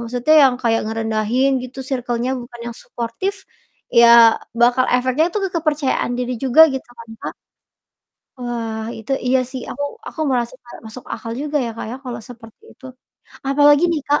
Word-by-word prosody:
maksudnya 245 +5 +1
yang 255 - -2
kayak 225 -1 +2
ngerendahin 225 +4 0
gitu, 255 +1 -10
circle-nya 245 -2 -2
bukan 240 0 -11
yang - - -16
suportif, 240 +12 -4 0.6
ya 235 - +8 0.5
bakal 245 +2 +4
efeknya 255 +5 +2
tuh 420 - 0
ke - - -6
kepercayaan 295 -6 -1
diri 250 0 -2
juga, 265 +4 +4
gitu 265 - -5
kan, 230 0 -11
Kak? - - -5 1.0
Wah, 230 -3 -4
itu, 220 +4 -7
iya 260 +1 +3
sih, 260 -1 -5
aku 285 - -4 0.2
aku - - -6
merasa 245 -2 -1
kayak 240 - -13
masuk 235 +3 -10
akal 230 - -7
juga 300 0 -1
ya, - - -3
Kak, - - -5
ya, 250 - -5
kalau 240 -2 -6
seperti 230 - -14
itu. - - -17 0.6
Apalagi 290 +2 +5
nih, 310 - -1
Kak, 290 +1 +3
245 Hz, 170 wpm, -19 LUFS, 235-270 Hz, 1.0 s, ya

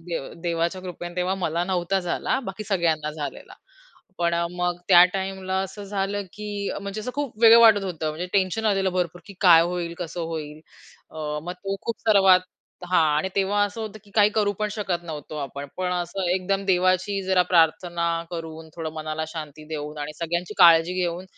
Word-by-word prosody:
दे 170 0 -4 0.2
देवाच्या 170 +1 -1
कृपेने 175 -1 -7
तेव्हा 180 +1 0
मला 175 -2 -1
नव्हता 185 +1 0
झाला. 180 +8 -1
बाकी 195 +3 -8
सगळ्यांना 165 -6 0
झालेला. 150 -3 -7 0.6
पण 170 0 +1
अ, 170 0 0
मग 180 0 -2
त्या 175 -2 +9
टाईमला 190 0 -2
असं 195 +2 -7
झालं, 200 0 -2
की 205 -1 -4
म्हणजे 200 +1 -5
असं 240 +4 -4
खूप 285 -3 -3
वेगळं 230 0 +9
वाटत 220 -3 +7
होतं, 165 -4 -3
म्हणजे 155 +4 -4
टेन्शन 195 +2 +1
आलेलं 195 -2 +2
भरपूर, 175 -1 -2
की 200 - -11
काय 170 -4 +7
होईल, 170 -1 -3
कसं 175 -1 -5
होईल? 155 -2 -5 0.5
अ, 150 -1 -4
मग 175 +2 -5
तो 195 +1 -5
खूप 230 - -4
सर्वात 195 -3 +6 0.5
हां, 180 -3 +5
आणि 155 +5 0
तेव्हा 200 +1 +2
असं 205 +2 -5
होतं 215 -1 -6
की 205 - -20
काही 210 -1 +5
करू 205 -2 +2
पण 215 0 0
शकत 190 -5 -2
नव्हतो 155 -2 -7
आपण. 140 0 -5
पण 185 -1 -1
असं 180 +1 -2
एकदम 195 +1 -1
देवाची 185 +1 +2
जरा 190 -1 +3
प्रार्थना 170 0 +2 0.2
करून, 160 -2 -7
थोडं 160 -2 -4
मनाला 155 0 -4
शांती 155 -2 -8
देऊन 150 -1 -5
आणि 145 +1 -4
सगळ्यांची 175 +4 -3
काळजी 170 -1 +7
घेऊन, 175 0 -2
180 Hz, 180 wpm, -24 LUFS, 165-195 Hz, 0.6 s, त्या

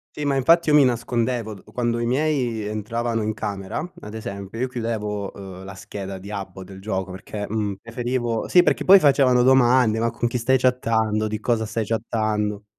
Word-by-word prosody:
Sì, 150 - -4
ma 140 -1 +1
infatti 160 +5 +4
io 150 - +5
mi 150 - +7
nascondevo, 120 -2 -1
d 95 - -15
quando 120 -1 0
i 120 - -1
miei 130 -3 0
entravano 115 +2 -2
in 110 - -1
camera, 100 +1 -4 0.2
ad 105 - -9
esempio, 100 -1 -7
io 130 - 0
chiudevo, 105 -5 -3
uhm, 95 -1 -10
la 95 0 -8
scheda 95 0 -7
di 100 - -10
app 100 -3 -6
o 95 - -7
del 95 +1 -11
gioco 95 -2 -3
perché, 100 +2 -6
mhmm, 105 -1 -1
preferivo 120 0 -2
sì, 180 - +6
perché - - +1
poi 195 +1 +9
facevano 135 -5 +4
domande, 125 -3 +4
ma 115 0 +1
con 120 0 -1
chi 120 - -2
stai 130 +3 +2
chattando? 110 -4 +1
Di 110 0 -3
cosa 110 0 0
stai 110 +1 -2
chattando? 105 -2 -1
115 Hz, 195 wpm, -23 LUFS, 105-125 Hz, 0.2 s, poi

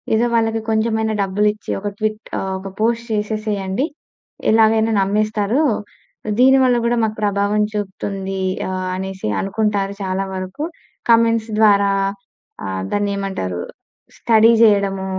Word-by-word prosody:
ఏదో 230 +2 +2
వాళ్ళకి 225 -1 +1
కొంచెం 220 +1 +1
అ‌యి‌నా 220 -1 0
డబ్బులు 205 +2 +1
ఇచ్చి 215 - -7
ఒక 205 - -2
ట్విట్ 215 0 -1 0.2
ఆహ్, 190 - -3
ఒక 195 - -7
పోస్ట్ 230 +1 +1
చేసేసేయండి. 210 +1 -1 0.7
ఎలాగైనా 220 0 +4
నమ్మేస్తారు. 210 +5 +1 0.8
దీని 265 +1 +6
వల్ల 250 -1 +3
కూడా 240 - +2
మాకు 215 -1 -1
ప్రభావం 205 +1 +1
చూపుతుంది. 195 -1 -4 0.3
ఆహ్, 185 0 -3
అనేసి 190 - -5
అనుకుంటారు 200 0 -1
చాలా 190 +1 -1
వరకు. 185 +9 -5 0.5
కామెంట్స్ 230 -1 +3
ద్వారా 200 -2 +5 0.7
ఆహ్, 95 -1 -3
దాన్ని 205 0 0
ఏమంటారు 95 - -3 0.6
స్టడీ 225 0 +4
చేయడము, 200 -3 +3
210 Hz, 125 wpm, -19 LUFS, 195-220 Hz, 0.8 s, దీని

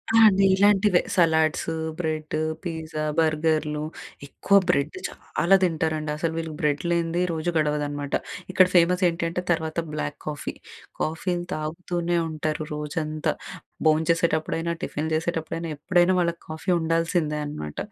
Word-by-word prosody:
ఆ! - - +7
అండి. 195 -2 +5
ఇలాంటివే 200 -1 +4 0.2
సలాడ్స్, 160 -2 +3 0.3
బ్రెడ్డు, 155 -2 -2 0.2
పీజా, 160 -3 -4 0.2
బర్గర్‌లు 155 -1 +1 0.5
ఎక్కువ 200 +7 +3
బ్రెడ్ 140 +5 +1
చాలా 185 +3 +1
తింటారండసలు, 160 -1 -1
వీళ్ళకి 160 -2 -4
బ్రెడ్ 150 -1 +1
లేనిదే 170 0 +1
రోజు 160 +1 -2
గడవదనమాట. 145 -2 -1 0.4
ఇక్కడ 185 0 +6
ఫేమసేంటంటే, 175 -1 +2
తర్వాత 160 -1 -1 0.2
బ్లాక్ 150 -1 -3
కాఫీ, 150 -2 -4 0.5
కాఫీలు 175 +2 -1
తాగుతూనే 170 +2 -2
ఉంటారు 155 0 -2
రోజంతా. 150 +1 -2 0.5
భోంచేసేటప్పుడైనా, 165 +1 +1
టిఫిన్ 155 +2 -2
చేసేటప్పుడైనా, 165 0 -2
ఎప్పుడైనా 175 +3 +3
వాళ్ళకి 170 -1 -1
కాఫీ 160 +4 -5
ఉండాల్సిందే 165 -1 0
అనమాట. 75 - -6
160 Hz, 110 wpm, -25 LUFS, 155-170 Hz, 0.5 s, ఆ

